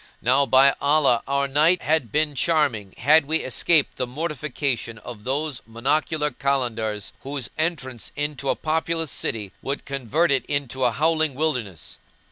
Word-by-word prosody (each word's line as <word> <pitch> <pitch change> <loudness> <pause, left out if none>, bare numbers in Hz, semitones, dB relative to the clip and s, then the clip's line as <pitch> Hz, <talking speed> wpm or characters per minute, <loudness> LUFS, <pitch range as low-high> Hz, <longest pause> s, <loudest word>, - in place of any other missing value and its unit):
Now 135 +3 +3
by 135 +3 +6
Allah, 140 -5 +3
our 140 0 +1
night 155 +6 +3
had 150 -8 +1
been 150 +2 +1
charming 140 - 0
had 150 +5 +5
we 160 +3 0
escaped 145 +4 +2
the 125 - -2
mortification 140 -4 -3
of 105 -1 -10
those 140 +1 -2
monocular 150 +5 0
Kalandars 115 -7 -1
whose 140 -2 -5
entrance 130 -7 -3
into 145 -2 -2
a - - +2
populous 160 0 -1
city 105 -4 -3
would 140 +1 -4
convert 140 +4 0
it 135 -3 +2
into 130 -3 -1
a 120 - +3
howling 155 +2 +1
wilderness." 125 - -3
140 Hz, 145 wpm, -23 LUFS, 125-155 Hz, -, by